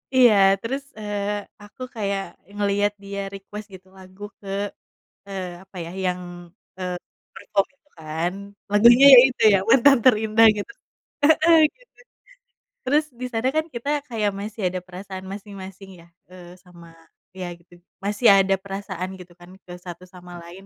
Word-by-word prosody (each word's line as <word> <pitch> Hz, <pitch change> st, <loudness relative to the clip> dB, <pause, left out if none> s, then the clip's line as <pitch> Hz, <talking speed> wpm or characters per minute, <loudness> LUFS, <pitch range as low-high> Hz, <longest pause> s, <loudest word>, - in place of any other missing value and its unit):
Iya 245 Hz, -4 st, +7 dB, 0.3 s
terus, 270 Hz, +4 st, -4 dB, 0.2 s
eee, 205 Hz, -1 st, -3 dB, 0.3 s
aku 205 Hz, +5 st, -17 dB
kayak 200 Hz, -2 st, -2 dB, 0.3 s
ngeliat 205 Hz, 0 st, +1 dB
dia 200 Hz, 0 st, -6 dB
request 205 Hz, +2 st, -9 dB
gitu 185 Hz, 0 st, -13 dB
lagu 190 Hz, +2 st, -14 dB, 0.2 s
ke, 200 Hz, -, -14 dB, 0.8 s
eee, 185 Hz, -3 st, -6 dB
apa 190 Hz, 0 st, -18 dB
ya, 165 Hz, -, -8 dB
yang, 180 Hz, 0 st, -1 dB, 0.6 s
eee, 180 Hz, -1 st, -4 dB, 0.4 s
perform 195 Hz, 0 st, -1 dB
itu 295 Hz, -, -39 dB
kan, 160 Hz, +3 st, -3 dB, 0.4 s
lagunya 235 Hz, +6 st, +7 dB
ya -, -, +11 dB
itu, 250 Hz, -, -6 dB
yang 190 Hz, 0 st, +2 dB
Mantan 270 Hz, +1 st, +6 dB
Terindah 220 Hz, -2 st, +5 dB
gitu 205 Hz, -, -6 dB, 0.5 s
heeh, 320 Hz, +2 st, +5 dB, 0.2 s
gitu. -, -, -28 dB, 0.9 s
Terus 300 Hz, +3 st, +2 dB, 0.2 s
di -, -, -2 dB
sana 225 Hz, +3 st, 0 dB
kan 315 Hz, 0 st, +1 dB
kita 235 Hz, +5 st, -4 dB, 0.2 s
kayak 210 Hz, -3 st, -1 dB
masih 210 Hz, +1 st, -7 dB
ada 185 Hz, -, -4 dB
perasaan 190 Hz, +1 st, -9 dB
masing-masing 195 Hz, -1 st, -10 dB
ya, 170 Hz, -, -19 dB, 0.2 s
eee, 180 Hz, -1 st, -13 dB
sama 170 Hz, -2 st, -16 dB, 0.5 s
iya 185 Hz, -1 st, -6 dB
gitu, 175 Hz, +1 st, -24 dB, 0.3 s
masih 210 Hz, +4 st, +1 dB
ada 195 Hz, 0 st, +3 dB
perasaan 195 Hz, -2 st, -6 dB
gitu 180 Hz, -1 st, -13 dB
kan, 175 Hz, +1 st, -14 dB
ke 180 Hz, -, -12 dB
satu 180 Hz, +1 st, -9 dB
sama 180 Hz, -1 st, -13 dB, 0.2 s
lain. 190 Hz, +3 st, -13 dB
200 Hz, 150 wpm, -23 LUFS, 185-225 Hz, 0.9 s, ya